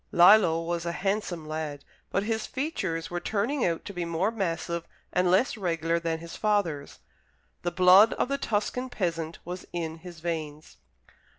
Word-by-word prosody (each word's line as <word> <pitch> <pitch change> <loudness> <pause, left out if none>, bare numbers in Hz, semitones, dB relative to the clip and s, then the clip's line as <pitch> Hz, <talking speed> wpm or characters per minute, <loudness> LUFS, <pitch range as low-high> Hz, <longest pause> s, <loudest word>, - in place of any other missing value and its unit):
Lillo 175 -2 +6
was 170 0 -2
a 170 - -1
handsome 190 -4 -2
lad, 155 -2 -4 0.2
but 195 - 0
his 220 0 -2
features 200 - -3
were 175 - -1
turning 220 +9 -1
out 165 -2 0
to 200 - -6
be 175 -2 -3
more 170 +5 0
massive 170 -5 -2 0.3
and 180 0 +3
less 195 +10 +3
regular 170 -3 0
than 165 -1 -1
his 165 +1 -9
father's. 190 -10 0 0.6
The 175 - 0
blood 185 +5 +7
of - - 0
the 275 +1 -1
Tuscan 250 +3 -1
peasant 170 -7 -2
was 180 +2 -6
in 165 -2 -3
his 170 0 -11
veins. 155 - -5
175 Hz, 165 wpm, -28 LUFS, 165-205 Hz, 0.6 s, blood